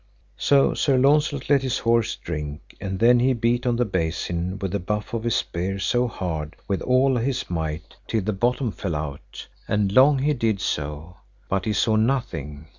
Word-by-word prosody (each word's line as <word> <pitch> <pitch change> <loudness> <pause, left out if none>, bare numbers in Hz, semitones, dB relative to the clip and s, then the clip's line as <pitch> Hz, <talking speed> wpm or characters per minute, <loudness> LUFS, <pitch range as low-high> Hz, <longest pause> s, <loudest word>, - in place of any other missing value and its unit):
So 140 -1 +4
Sir 135 -3 +2
Launcelot 145 +1 +2
let 140 -1 +4
his 130 -2 -1
horse 115 -1 +1
drink, 75 +1 -7
and 95 -1 -3
then 120 +4 +5
he 130 +2 +3
beat 120 +1 0
on 120 - +2
the 120 +1 +1
basin 85 -1 -2
with 95 -2 -3
the 100 - -1
butt 105 +5 -3
of 115 0 -3
his 120 - +1
spear 90 +3 -2
so 120 +6 +1
hard 80 -7 -4
with 100 - -1
all 130 +1 +3
his 125 -3 -2
might 80 0 -4
till 110 - 0
the 110 +2 -1
bottom 120 +4 0
fell 90 -1 -4
out, 75 -1 -6 0.2
and 105 -2 +1
long 135 +6 +6
he 145 +3 +1
did 115 -6 0
so, 75 +3 -4 0.3
but 95 -1 -1
he 110 - 0
saw 110 +1 +2
nothing. 90 - -1
105 Hz, 190 wpm, -24 LUFS, 85-125 Hz, 0.3 s, long